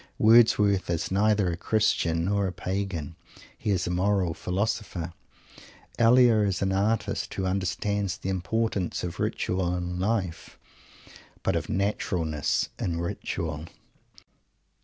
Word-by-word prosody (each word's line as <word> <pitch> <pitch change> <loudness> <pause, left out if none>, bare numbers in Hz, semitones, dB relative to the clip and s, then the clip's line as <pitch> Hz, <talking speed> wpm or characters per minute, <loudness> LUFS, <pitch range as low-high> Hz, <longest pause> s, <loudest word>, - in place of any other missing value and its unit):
Wordsworth 105 -4 +5
is 85 +1 -1
neither 100 -1 +2
a - - -2
Christian 85 -4 +1
or 100 0 +1
a - - -3
Pagan. 95 -4 -4 0.4
He - - -4
is 95 -3 +1
a - - -2
moral 95 -1 +1
philosopher. 90 -2 -2 0.9
Elia 120 -1 +6
is 100 -3 +1
an 95 - +1
artist, 105 +3 0
who 95 - -2
understands 100 0 -1
the 95 - -5
importance 95 +1 -1
of 90 0 -5
ritual 90 -1 -1
in 90 0 -4
life 95 -4 -2 0.9
but - - +1
of - - -2
naturalness 90 -6 0
in 85 -2 -2
ritual. 80 -2 -4
95 Hz, 120 wpm, -27 LUFS, 90-105 Hz, 0.9 s, Elia